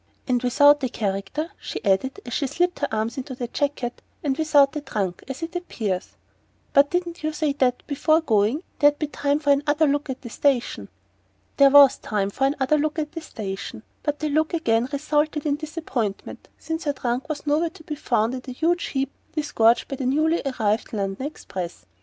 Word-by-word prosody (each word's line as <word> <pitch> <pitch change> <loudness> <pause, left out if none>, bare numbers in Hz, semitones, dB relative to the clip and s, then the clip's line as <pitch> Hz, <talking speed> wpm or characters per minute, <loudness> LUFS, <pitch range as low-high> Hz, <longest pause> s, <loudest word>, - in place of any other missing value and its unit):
"And 250 -2 +2
without 285 +3 +5
a 260 - +1
character!" 205 - -3
she - - -6
added, 200 +7 +1
as 245 - -6
she 280 - 0
slipped 355 +6 0
her - - 0
arms 220 +2 -2
into 260 0 -5
the 245 -1 -4
jacket. 255 -2 -2 0.2
"And 275 -3 +1
without 295 -2 +4
a 300 - -2
trunk, 200 -10 -3
as 270 +4 -6
it 330 +2 -5
appears 215 - -3 0.6
but 280 +1 +6
didn't 350 0 -2
you 310 - 0
say 305 -2 0
that, 255 -3 +1
before 310 +2 +2
going, 225 - +1 0.2
there'd 290 -1 +5
be 305 - -1
time 285 -1 0
for 295 -1 +2
another 295 +2 +3
look 290 0 0
at 260 - -5
the 240 - -7
station?" 240 - 0 0.7
There 280 0 +7
was 280 -1 +7
time 200 -2 -1
for 270 - 0
another 280 +1 +1
look 305 +2 -1
at 300 -1 -2
the 330 - -6
station; 210 -5 -6 0.2
but 295 -1 -1
the 305 0 -2
look 310 +3 +1
again 235 -6 +1
resulted 300 +1 0
in 290 -1 +1
disappointment, 300 - -4
since 320 0 -4
her 290 - +1
trunk 255 +3 -2
was 300 -1 -4
nowhere 305 +3 +2
to 330 -1 -16
be 305 - -5
found 235 -5 0
in 260 - -3
the 255 0 -8
huge 335 +6 +1
heap 270 0 -2 0.2
disgorged 240 -7 +3
by 275 - -5
the 255 - -2
newly 310 +5 +2
arrived 220 -5 -1
London 200 +5 -2
express. 175 - -7
280 Hz, 195 wpm, -24 LUFS, 240-305 Hz, 0.7 s, There